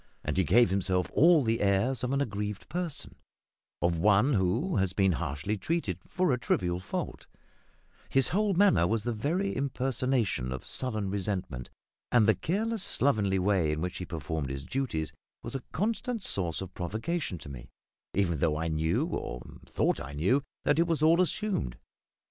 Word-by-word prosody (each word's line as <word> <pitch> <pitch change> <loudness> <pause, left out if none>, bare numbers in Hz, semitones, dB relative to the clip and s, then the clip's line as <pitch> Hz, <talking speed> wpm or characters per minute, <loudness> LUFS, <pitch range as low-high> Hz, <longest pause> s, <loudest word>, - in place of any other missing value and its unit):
And 75 - -2
he 95 - +3
gave 115 +7 +4
himself 95 -2 0
all 165 -1 +6
the 115 0 0
airs 100 +7 +1
of 125 - 0
an 140 0 +1
aggrieved 105 -4 -3
person 170 -2 -3 0.7
of 85 -1 +2
one 105 - +4
who 115 - +1
has 95 -2 +1
been 95 -1 +3
harshly 80 +5 -2
treated 105 - -1
for 185 -4 +1
a 125 - 0
trivial 90 -6 0
fault; 95 - -5 0.8
his 135 -1 +3
whole 200 +1 +1
manner 190 - +5
was 110 +1 0
the 120 - -1
very 165 - -1
impersonation 130 - 0
of 65 - -5
sullen 110 -7 -2
resentment, 90 - -3 0.4
and 115 -4 +5
the 110 - +6
careless, 205 - -1
slovenly 105 -8 +1
way 95 -4 +2
in 75 - -2
which 90 +2 -3
he 90 - -4
performed 80 -4 -4
his 70 0 -5
duties 120 - -2 0.3
was - - -5
a 135 - -3
constant 225 +3 -1
source 85 - 0
of 95 -1 -7
provocation 110 - -3
to 75 - -10
me, 65 -3 -9 0.5
even 85 -5 +1
though 75 0 +1
I 80 +1 -1
knew 80 +1 +1
or 60 -1 -4 0.2
thought - - 0
I 70 0 -7
knew 95 - +2 0.2
that 145 - +3
it 170 - +3
was 165 -3 0
all 165 +3 +5
assumed. 185 - -1
105 Hz, 170 wpm, -29 LUFS, 85-140 Hz, 0.8 s, all